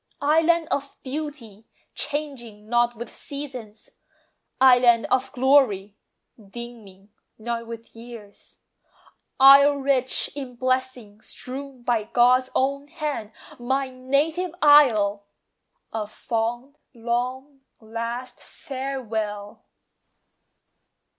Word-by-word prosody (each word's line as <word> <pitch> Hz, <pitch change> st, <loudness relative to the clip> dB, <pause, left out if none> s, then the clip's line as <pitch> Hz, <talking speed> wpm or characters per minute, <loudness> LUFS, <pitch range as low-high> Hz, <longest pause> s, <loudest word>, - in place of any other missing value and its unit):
Island 325 Hz, +2 st, +3 dB
of 280 Hz, 0 st, -3 dB
beauty, 260 Hz, -7 st, -7 dB, 0.3 s
changing 255 Hz, -8 st, -5 dB
not 240 Hz, +1 st, +2 dB
with 235 Hz, +1 st, -8 dB
seasons; 255 Hz, -7 st, -8 dB, 0.7 s
Island 245 Hz, -3 st, +6 dB
of 260 Hz, 0 st, +1 dB
glory, 245 Hz, -7 st, +2 dB, 0.5 s
dimming 205 Hz, -2 st, -11 dB, 0.3 s
not 230 Hz, +1 st, -4 dB
with 230 Hz, 0 st, -10 dB
years; 225 Hz, -3 st, -13 dB, 0.8 s
Isle 275 Hz, +2 st, +8 dB
rich 270 Hz, -2 st, 0 dB
in 265 Hz, -4 st, -7 dB
blessings 255 Hz, -4 st, -3 dB
strewn 265 Hz, -1 st, -8 dB
by 235 Hz, -3 st, 0 dB
God's 250 Hz, +3 st, +3 dB
own 280 Hz, +2 st, 0 dB
hand, 295 Hz, -9 st, -4 dB, 0.3 s
My 265 Hz, +2 st, -1 dB
native 300 Hz, +7 st, -1 dB
Isle! 225 Hz, -, +5 dB, 0.7 s
A 215 Hz, -2 st, -3 dB
fond 235 Hz, +5 st, -4 dB, 0.2 s
long 250 Hz, +4 st, -3 dB, 0.2 s
last 230 Hz, +3 st, -6 dB
farewell! 225 Hz, -7 st, -5 dB
250 Hz, 90 wpm, -24 LUFS, 225-275 Hz, 0.8 s, Isle